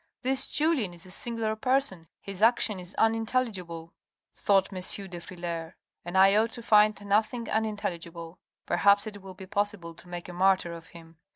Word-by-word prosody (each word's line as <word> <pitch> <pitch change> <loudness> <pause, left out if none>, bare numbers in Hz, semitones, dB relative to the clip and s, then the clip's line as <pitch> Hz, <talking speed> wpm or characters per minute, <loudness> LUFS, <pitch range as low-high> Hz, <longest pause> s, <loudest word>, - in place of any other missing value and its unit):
"This 265 +1 +2
Julien 295 - 0
is 170 - -11
a 185 - -11
singular 225 +1 -1
person, 250 -8 0
his 195 -1 -8
action 225 -3 +3
is 180 +1 -9
unintelligible," 220 -8 -1 0.4
thought 195 -1 +2
M. 185 - -4 0.3
de 175 -1 -7
Frilair, 170 -1 -6 0.3
"and 175 +2 -3
I 195 +1 +6
ought 225 +2 +3
to 235 - -8
find 210 -2 +5
nothing 215 +4 +1
unin 220 -1 -1
telligible. 170 -2 -6 0.3
Perhaps 200 +1 +4
it 205 -2 -8
will 190 -1 -10
be 190 0 -10
possible 200 -3 -2
to 175 - -13
make 175 0 -6
a 180 - -8
martyr 185 -1 +2
of 165 0 -10
him. 165 -2 -15
195 Hz, 175 wpm, -28 LUFS, 175-220 Hz, 0.4 s, I